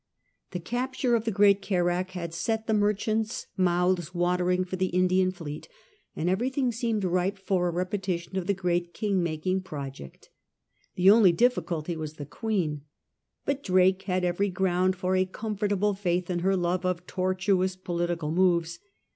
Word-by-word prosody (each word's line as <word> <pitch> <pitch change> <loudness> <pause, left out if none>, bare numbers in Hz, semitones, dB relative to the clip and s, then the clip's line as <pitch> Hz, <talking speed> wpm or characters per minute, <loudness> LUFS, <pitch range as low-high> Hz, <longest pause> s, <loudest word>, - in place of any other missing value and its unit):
The 180 - -4
capture 250 +6 -1
of 230 -1 +1
the 225 - 0
great 200 0 +4
carack 185 -1 0
had 170 -2 -5
set 220 +5 -1
the 220 - 0
merchants' 215 +2 0
mouths 180 -1 +1
watering 180 +1 +1
for 185 - -4
the 185 0 0
Indian 185 +1 +2
fleet, 165 -5 -7 0.5
and 165 - -2
everything 250 +7 +1
seemed 230 -2 -1
ripe 185 +2 0
for 190 -2 0
a - - 0
repetition 185 0 -3
of 190 -2 -2
the 200 - +2
great 175 -2 -1
king 200 -4 0
making 170 +3 -1
project. 135 - -9 0.6
The 185 +2 +6
only 210 -4 +7
difficulty 170 -6 0
was 155 -1 -5
the 145 -2 -8
Queen, 155 0 -2 0.6
But 280 0 -1
Drake 185 -3 +3
had 185 -2 -1
every 180 +3 +1
ground 185 0 +1
for 185 0 -1
a 185 - +4
comfortable 205 +1 -1
faith 180 -2 -1
in 175 - 0
her 190 +2 +2
love 175 +1 0
of 180 -1 -1
tortuous 185 0 0
political 175 -3 -2
moves. 170 -1 +2
185 Hz, 160 wpm, -27 LUFS, 175-200 Hz, 0.6 s, only